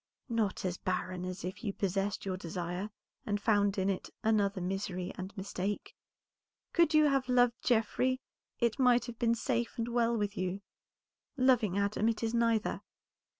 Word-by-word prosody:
"Not 220 Hz, -5 st, 0 dB
as 180 Hz, -1 st, -1 dB
barren 185 Hz, 0 st, -2 dB
as 185 Hz, 0 st, -5 dB
if 185 Hz, +6 st, -6 dB
you 205 Hz, -3 st, -1 dB
possessed 195 Hz, +1 st, -1 dB
your 190 Hz, -1 st, -1 dB
desire, 180 Hz, +2 st, -4 dB, 0.3 s
and 205 Hz, -1 st, -1 dB
found 205 Hz, -1 st, +2 dB
in 190 Hz, 0 st, +1 dB
it 195 Hz, -2 st, -2 dB
another 205 Hz, -3 st, +2 dB
misery 185 Hz, 0 st, -3 dB
and 185 Hz, +1 st, -6 dB
mistake. 195 Hz, +1 st, -3 dB, 0.8 s
Could 335 Hz, -2 st, +4 dB
you 305 Hz, 0 st, +7 dB
have 270 Hz, -3 st, +2 dB
loved 245 Hz, -1 st, +3 dB
Geoffrey, 250 Hz, +2 st, +2 dB, 0.4 s
it 235 Hz, +1 st, +1 dB
might 250 Hz, -2 st, +5 dB
have 240 Hz, -2 st, -8 dB
been 235 Hz, -1 st, +3 dB
safe 235 Hz, 0 st, -1 dB
and 230 Hz, 0 st, -1 dB
well 235 Hz, -1 st, +2 dB
with 205 Hz, -1 st, -1 dB
you; 185 Hz, 0 st, -2 dB, 0.8 s
loving 245 Hz, -7 st, +3 dB
Adam, 200 Hz, +2 st, +1 dB
it 230 Hz, 0 st, -2 dB
is 225 Hz, 0 st, 0 dB
neither. 230 Hz, -2 st, +1 dB
210 Hz, 160 wpm, -32 LUFS, 190-235 Hz, 0.8 s, you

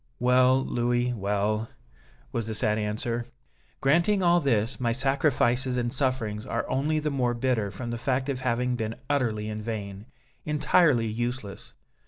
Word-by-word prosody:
"Well, 130 Hz, +1 st, +4 dB
Louis, 120 Hz, +1 st, 0 dB
well," 105 Hz, +1 st, -1 dB, 0.6 s
was 115 Hz, -2 st, -2 dB
the 110 Hz, -, -3 dB
sad 105 Hz, 0 st, +1 dB
answer, 110 Hz, +3 st, -2 dB, 0.6 s
"granting 170 Hz, +8 st, +3 dB
all 175 Hz, 0 st, +5 dB
this, 120 Hz, -5 st, 0 dB
my 120 Hz, -2 st, +1 dB
sacrifices 130 Hz, -1 st, +1 dB
and 120 Hz, 0 st, -1 dB
sufferings 130 Hz, -6 st, -1 dB
are -, -, -3 dB
only 145 Hz, +4 st, 0 dB
the 150 Hz, 0 st, -1 dB
more 125 Hz, -3 st, 0 dB
bitter 115 Hz, -4 st, 0 dB
from 120 Hz, +3 st, -6 dB
the 120 Hz, -, -4 dB
fact 130 Hz, +2 st, 0 dB
of 135 Hz, -2 st, -2 dB
having 125 Hz, 0 st, 0 dB
been 110 Hz, -1 st, -3 dB, 0.2 s
utterly 115 Hz, -7 st, 0 dB
in 110 Hz, 0 st, -4 dB
vain, 105 Hz, -2 st, -5 dB, 0.4 s
entirely 150 Hz, -4 st, +3 dB
useless. 115 Hz, -1 st, -4 dB
120 Hz, 150 wpm, -27 LUFS, 110-130 Hz, 0.6 s, all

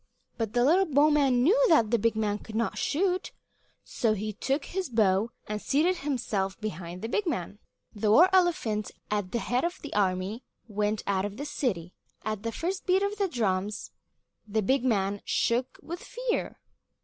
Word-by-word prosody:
But 225 Hz, -2 st, -3 dB
the 245 Hz, 0 st, +3 dB
little 365 Hz, +7 st, +4 dB
bowman 285 Hz, -4 st, +4 dB
knew 440 Hz, -, +4 dB
that 230 Hz, -10 st, +4 dB
the 235 Hz, -, +3 dB
big 230 Hz, +1 st, +1 dB
man 210 Hz, -1 st, 0 dB
could 220 Hz, -, -10 dB
not 230 Hz, +1 st, 0 dB
shoot, 365 Hz, +4 st, 0 dB, 0.5 s
so 225 Hz, -4 st, 0 dB
he 215 Hz, +1 st, -3 dB
took 275 Hz, +7 st, -1 dB
his 375 Hz, -3 st, -3 dB
bow 215 Hz, -2 st, +2 dB, 0.2 s
and 210 Hz, 0 st, -3 dB
seated 340 Hz, +6 st, +2 dB
himself 225 Hz, -, -2 dB
behind 180 Hz, -3 st, -6 dB
the -, -, -1 dB
big 390 Hz, -, -1 dB
man. 205 Hz, -, -3 dB, 0.3 s
Then 210 Hz, -, -12 dB
the 215 Hz, -, +2 dB
war 330 Hz, +11 st, +8 dB
elephant, 315 Hz, -, +2 dB, 0.2 s
at 205 Hz, -3 st, -1 dB
the -, -, 0 dB
head 245 Hz, +2 st, 0 dB
of 345 Hz, +1 st, -2 dB
the 295 Hz, -, -6 dB
army, 195 Hz, +3 st, 0 dB, 0.2 s
went 210 Hz, 0 st, -1 dB
out 195 Hz, -1 st, +1 dB
of 205 Hz, +1 st, -6 dB
the 285 Hz, -, -4 dB
city. 185 Hz, -, -2 dB, 0.3 s
At 215 Hz, -2 st, -2 dB
the 230 Hz, +1 st, -3 dB
first 370 Hz, -, -3 dB
beat 375 Hz, +2 st, +3 dB
of 405 Hz, +1 st, -2 dB
the 400 Hz, -, +2 dB
drums, 210 Hz, -, -1 dB, 0.6 s
the 215 Hz, +1 st, 0 dB
big 260 Hz, +5 st, +2 dB
man 205 Hz, -5 st, +1 dB
shook 245 Hz, +2 st, 0 dB
with 345 Hz, +2 st, -6 dB
fear. -, -, -3 dB
230 Hz, 185 wpm, -28 LUFS, 205-305 Hz, 0.6 s, war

